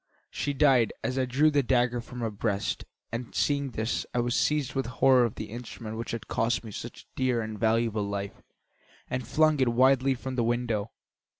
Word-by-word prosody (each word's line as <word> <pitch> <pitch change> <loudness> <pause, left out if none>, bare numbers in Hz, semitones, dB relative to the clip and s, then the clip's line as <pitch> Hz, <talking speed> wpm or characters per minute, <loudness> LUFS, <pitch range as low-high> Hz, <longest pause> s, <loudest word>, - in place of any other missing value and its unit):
She 145 - -2
died 135 -5 +4
as 130 +1 -1
I 130 - +2
drew 140 +5 +3
the 145 -1 +3
dagger 120 -1 +1
from 125 +1 -9
her 115 -1 -1
breast, 105 -1 -2 0.3
and 115 +1 -5
seeing 140 -1 +1
this, 110 0 -2
I - - +2
was 120 0 0
seized 150 -2 +1
with 135 -2 -1
horror 125 +1 +4
of 115 - -3
the 110 -1 -6
instrument 115 -2 -7
which 115 0 -5
had 115 -2 -5
cost 120 +2 0
me 110 - -8
such - - -8
a - - -42
dear 130 -2 +1
and 110 -1 -6
valuable 110 -2 +1
life 100 0 -5 0.7
and 125 -2 -2
flung 155 +2 +3
it 130 -2 +3
wildly 130 +2 +4
from 130 +1 -6
the 120 - +2
window. 115 -3 0
120 Hz, 200 wpm, -28 LUFS, 115-130 Hz, 0.7 s, died